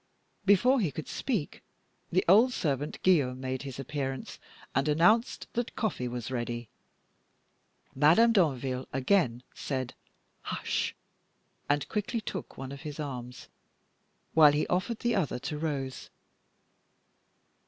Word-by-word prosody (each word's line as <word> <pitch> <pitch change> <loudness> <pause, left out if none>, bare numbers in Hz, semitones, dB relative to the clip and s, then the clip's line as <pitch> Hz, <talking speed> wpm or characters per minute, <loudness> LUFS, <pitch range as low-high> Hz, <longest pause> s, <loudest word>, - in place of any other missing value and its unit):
Before 240 +7 +5
he 190 -8 +1
could 155 +2 -7
speak, 215 - -3 0.5
the 185 - +2
old 225 +8 +6
servant 145 - -2
Guillaume 140 -9 +3
made 130 0 -3
his 135 -3 -7
appearance, 135 -1 -4 0.3
and 135 +2 +1
announced 180 - +3
that 240 -1 -2
coffee 205 - -1
was 120 0 -5
ready. 120 -2 -3 1.2
Madame 165 - +5
Danville 135 - +1
again 130 -3 +2
said 130 -2 -3 0.5
"Hush!" - - -2 0.7
and 145 -1 +1
quickly 215 +2 -2
took 220 - -6
one 135 0 -6
of 140 0 -8
his 150 -1 -7
arms, 125 -4 -6 0.9
while 150 -2 +7
he 150 - +1
offered 190 +6 -1
the 240 0 +1
other 185 - 0
to 150 +4 -5
Rose. 140 -5 -3
145 Hz, 120 wpm, -29 LUFS, 130-190 Hz, 1.2 s, while